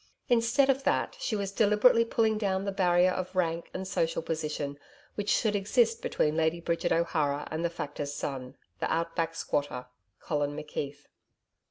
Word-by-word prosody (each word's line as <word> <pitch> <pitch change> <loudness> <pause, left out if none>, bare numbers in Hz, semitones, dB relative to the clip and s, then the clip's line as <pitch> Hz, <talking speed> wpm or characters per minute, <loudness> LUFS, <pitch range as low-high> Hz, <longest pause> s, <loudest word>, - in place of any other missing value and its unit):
Instead 240 +3 +4
of 270 0 +2
that, - - +1
she 225 - -1
was 200 -2 -2
deliberately 210 +3 +5
pulling 225 -1 +1
down 195 -2 0
the 200 - -1
barrier 180 -1 +3
of 185 0 -4
rank 170 -2 0
and 190 0 -5
social 165 -3 0
position 150 -3 -3 0.3
which 205 0 -3
should 215 -3 +2
exist 460 - +2
between 155 - 0
Lady 160 +1 +1
Bridget 170 +1 -1
O'Hara 150 -4 +1
and 160 +2 -2
the 170 - +1
Factor's 145 -3 -5
son, 130 -3 -5 0.2
the - - -1
Out 165 0 -1
Back 165 0 -1
squatter 145 -5 -2 0.3
Colin 145 -1 -1
McKeith. 145 -1 -5
170 Hz, 165 wpm, -29 LUFS, 150-210 Hz, 0.3 s, deliberately